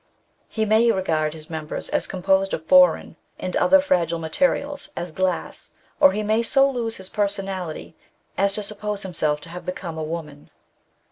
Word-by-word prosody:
He 220 Hz, -1 st, -1 dB
may 220 Hz, +2 st, +4 dB
regard 160 Hz, -6 st, 0 dB
his 155 Hz, -1 st, -11 dB
members 155 Hz, -2 st, -5 dB
as -, -, 0 dB
composed 190 Hz, +1 st, +1 dB
of 160 Hz, -, -10 dB
foreign 275 Hz, +4 st, +4 dB, 0.2 s
and -, -, -4 dB
often 285 Hz, 0 st, +5 dB
fragile 170 Hz, -, +1 dB
materials, 275 Hz, -, -1 dB
as 175 Hz, 0 st, -4 dB
glass, 185 Hz, +1 st, -2 dB, 0.3 s
or -, -, +7 dB
he 210 Hz, +2 st, -2 dB
may 215 Hz, +2 st, +2 dB
so 270 Hz, +4 st, +4 dB
lose 235 Hz, -4 st, -2 dB
his 190 Hz, -, -9 dB
personality 195 Hz, -6 st, -3 dB, 0.4 s
as 200 Hz, 0 st, +2 dB
to 210 Hz, -, -2 dB
suppose 210 Hz, 0 st, -3 dB
himself 155 Hz, -5 st, -1 dB
to -, -, -11 dB
have 180 Hz, +1 st, -8 dB
become 170 Hz, -3 st, -5 dB
a -, -, -2 dB
woman. 155 Hz, -2 st, -7 dB
190 Hz, 165 wpm, -23 LUFS, 165-215 Hz, 0.4 s, or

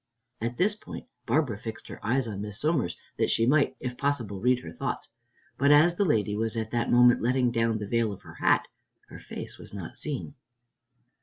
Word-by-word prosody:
At 115 Hz, +2 st, -2 dB
this 200 Hz, +4 st, +3 dB
point 210 Hz, -, -9 dB, 0.2 s
Barbara 125 Hz, -4 st, +1 dB
fixed 110 Hz, 0 st, -7 dB
her -, -, -9 dB
eyes 125 Hz, +2 st, +1 dB
on 100 Hz, -3 st, -4 dB
Miss 105 Hz, 0 st, -6 dB
Somers, 145 Hz, -, 0 dB, 0.2 s
that -, -, +2 dB
she 115 Hz, -, +3 dB
might, 130 Hz, 0 st, +3 dB
if 125 Hz, -1 st, -5 dB
possible, 125 Hz, -9 st, -1 dB
read 125 Hz, +1 st, +4 dB
her -, -, -8 dB
thoughts, -, -, -4 dB, 0.5 s
but 140 Hz, +1 st, +4 dB
as 155 Hz, +4 st, +6 dB
the 200 Hz, -, +2 dB
lady 105 Hz, -, +1 dB
was 115 Hz, +1 st, -1 dB
at 110 Hz, -1 st, -3 dB
that 120 Hz, -1 st, 0 dB
moment 120 Hz, 0 st, +6 dB
letting 125 Hz, +1 st, +2 dB
down 115 Hz, -1 st, +1 dB
the 105 Hz, -, -4 dB
veil 115 Hz, +1 st, +1 dB
of 100 Hz, -, -9 dB
her -, -, -11 dB
hat, -, -, +2 dB, 0.4 s
her -, -, -10 dB
face -, -, -8 dB
was -, -, -9 dB
not 95 Hz, -5 st, -7 dB
seen. 145 Hz, -1 st, -4 dB
120 Hz, 205 wpm, -28 LUFS, 110-140 Hz, 0.5 s, as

